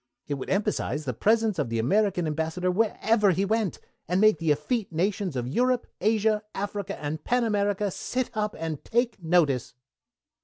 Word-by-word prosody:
It 145 Hz, -, -3 dB
would 135 Hz, -2 st, -5 dB
emphasize 195 Hz, -6 st, -1 dB
the 125 Hz, -, -2 dB
presence 220 Hz, -, +2 dB
of 145 Hz, -, 0 dB
the 115 Hz, -, -1 dB
American 180 Hz, -, +2 dB
Ambassador 160 Hz, +4 st, -1 dB
wherever 215 Hz, +1 st, +2 dB
he 190 Hz, +2 st, +2 dB
went, 215 Hz, -2 st, 0 dB, 0.3 s
and 180 Hz, +3 st, +1 dB
make 215 Hz, -5 st, +5 dB
the 165 Hz, -, -1 dB
effete 185 Hz, -, -1 dB
nations 185 Hz, 0 st, -1 dB
of 120 Hz, -1 st, -2 dB
Europe, 250 Hz, -, +1 dB, 0.2 s
Asia, 215 Hz, +1 st, +2 dB
Africa, 205 Hz, 0 st, -4 dB
and 150 Hz, +1 st, -4 dB
Pan 245 Hz, 0 st, +1 dB
America 205 Hz, -2 st, 0 dB
sit 255 Hz, +7 st, -3 dB
up 210 Hz, 0 st, -2 dB
and 160 Hz, -2 st, -4 dB
take 240 Hz, -3 st, 0 dB
notice." 160 Hz, -8 st, +1 dB
195 Hz, 165 wpm, -26 LUFS, 160-215 Hz, 0.3 s, make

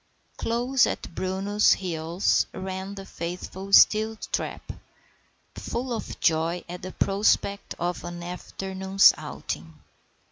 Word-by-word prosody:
Close 245 Hz, +3 st, +2 dB
at -, -, -5 dB
Bruno's 195 Hz, +4 st, +2 dB
heels 170 Hz, 0 st, 0 dB
ran 190 Hz, +1 st, -5 dB
the 195 Hz, -1 st, -8 dB
faithful 180 Hz, +2 st, -6 dB
Steeltrap, 215 Hz, +2 st, +3 dB, 0.8 s
full 245 Hz, +1 st, -4 dB
of 225 Hz, -, -5 dB
joy 165 Hz, +2 st, +1 dB
at 175 Hz, +1 st, -7 dB
the 185 Hz, -, -6 dB
prospect 200 Hz, 0 st, +1 dB
of 175 Hz, +1 st, -2 dB
an 175 Hz, 0 st, -6 dB
afternoon's 190 Hz, +2 st, +2 dB
outing. -, -, -6 dB
190 Hz, 105 wpm, -26 LUFS, 175-205 Hz, 0.8 s, Steeltrap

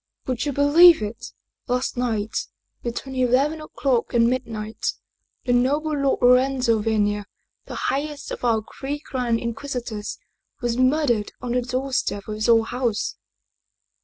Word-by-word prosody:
" -, -, -53 dB
Would 255 Hz, +2 st, -2 dB
you -, -, 0 dB
believe 295 Hz, +2 st, +6 dB
it! 210 Hz, +2 st, -6 dB, 0.4 s
Last 250 Hz, +1 st, -1 dB
night, 225 Hz, -4 st, -1 dB, 0.3 s
between 245 Hz, +3 st, -5 dB
eleven 265 Hz, +5 st, +2 dB
o'clock 265 Hz, -6 st, -1 dB
and 230 Hz, 0 st, +5 dB
mid 255 Hz, 0 st, -1 dB
night, 215 Hz, -1 st, -3 dB, 0.5 s
the 245 Hz, -, +2 dB
noble 285 Hz, +6 st, +2 dB
Lord 275 Hz, -3 st, 0 dB
Lorenzo 250 Hz, -2 st, +4 dB
Venier, 210 Hz, -1 st, 0 dB, 0.4 s
the -, -, -7 dB
highest 285 Hz, +2 st, -3 dB
of -, -, -6 dB
our 225 Hz, -3 st, +2 dB, 0.2 s
three 280 Hz, +2 st, -3 dB
grand 250 Hz, -5 st, -1 dB
Inquisitors, 235 Hz, -3 st, -4 dB, 0.4 s
was 240 Hz, -2 st, -1 dB
murdered 255 Hz, -4 st, +2 dB
on 245 Hz, -1 st, -4 dB
the 250 Hz, +1 st, +1 dB
doorstep 255 Hz, -4 st, -2 dB
of 215 Hz, -, -4 dB
his 215 Hz, +2 st, -1 dB
own 225 Hz, -1 st, +6 dB
house! 240 Hz, -3 st, -2 dB
250 Hz, 145 wpm, -23 LUFS, 230-270 Hz, 0.5 s, believe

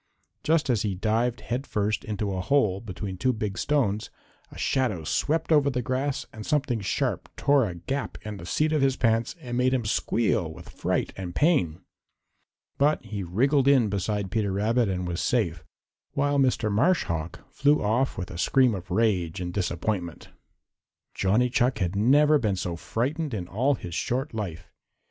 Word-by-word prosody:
Just 155 Hz, -4 st, +2 dB
as 115 Hz, -5 st, +1 dB
he 100 Hz, -2 st, -1 dB
dived 115 Hz, +5 st, 0 dB
head 125 Hz, +4 st, -3 dB
first 105 Hz, 0 st, -1 dB
into 105 Hz, -2 st, -3 dB
a 95 Hz, -, -2 dB
hole 105 Hz, -5 st, +2 dB
between 95 Hz, -2 st, -6 dB
two 130 Hz, +8 st, +2 dB
big 105 Hz, -4 st, -3 dB
stones, 110 Hz, -6 st, 0 dB, 0.4 s
a -, -, -12 dB
shadow 115 Hz, -11 st, 0 dB
swept 160 Hz, -, 0 dB
over 145 Hz, -2 st, +5 dB
the 125 Hz, -2 st, -2 dB
grass 130 Hz, +3 st, -1 dB
and 110 Hz, -2 st, -8 dB
something 135 Hz, -6 st, 0 dB
sharp 100 Hz, -, -1 dB
tore 140 Hz, -6 st, +3 dB
a 90 Hz, -, -7 dB
gap 135 Hz, +11 st, -4 dB
in 105 Hz, -1 st, -6 dB
the 85 Hz, -, -9 dB
seat 155 Hz, -, +1 dB
of 155 Hz, -, +2 dB
his 135 Hz, -1 st, +3 dB
pants 115 Hz, +1 st, +1 dB
and 125 Hz, -5 st, -5 dB
made 130 Hz, +1 st, +3 dB
him 120 Hz, -4 st, -2 dB
squeal 105 Hz, -5 st, 0 dB
with -, -, -12 dB
fright -, -, -2 dB
and 90 Hz, -2 st, -6 dB
pain. 95 Hz, -, +2 dB, 1.0 s
But 145 Hz, -3 st, +2 dB
he 105 Hz, -2 st, -5 dB
wriggled 130 Hz, -, +2 dB
in 130 Hz, -6 st, +5 dB
beside 100 Hz, 0 st, -2 dB
Peter 105 Hz, -3 st, 0 dB
Rabbit 110 Hz, +3 st, +1 dB
and 90 Hz, -1 st, -2 dB
was 85 Hz, 0 st, -2 dB
safe, 85 Hz, -10 st, 0 dB, 0.5 s
while 145 Hz, 0 st, +1 dB
Mr. 125 Hz, -5 st, +2 dB
Marsh 170 Hz, -, +3 dB
Hawk 85 Hz, +1 st, -4 dB
flew 145 Hz, -2 st, +2 dB
off 120 Hz, +6 st, +1 dB
with 90 Hz, -4 st, -5 dB
a 85 Hz, -, -7 dB
scream 130 Hz, +4 st, +3 dB
of 95 Hz, -2 st, -6 dB
rage 95 Hz, -4 st, +1 dB
and 90 Hz, -1 st, -4 dB
disappointment. 90 Hz, -2 st, -2 dB, 0.8 s
Johnny 105 Hz, +6 st, +2 dB
Chuck 130 Hz, -1 st, +2 dB
had 90 Hz, -2 st, -1 dB
never 145 Hz, +8 st, +5 dB
been 105 Hz, -6 st, 0 dB
so 90 Hz, -2 st, -3 dB
frightened 135 Hz, -, -2 dB
in 90 Hz, -4 st, -4 dB
all 130 Hz, +10 st, +1 dB
his 90 Hz, -7 st, -8 dB
short 130 Hz, -, -2 dB
life. 90 Hz, -6 st, -5 dB
110 Hz, 175 wpm, -26 LUFS, 95-135 Hz, 1.0 s, over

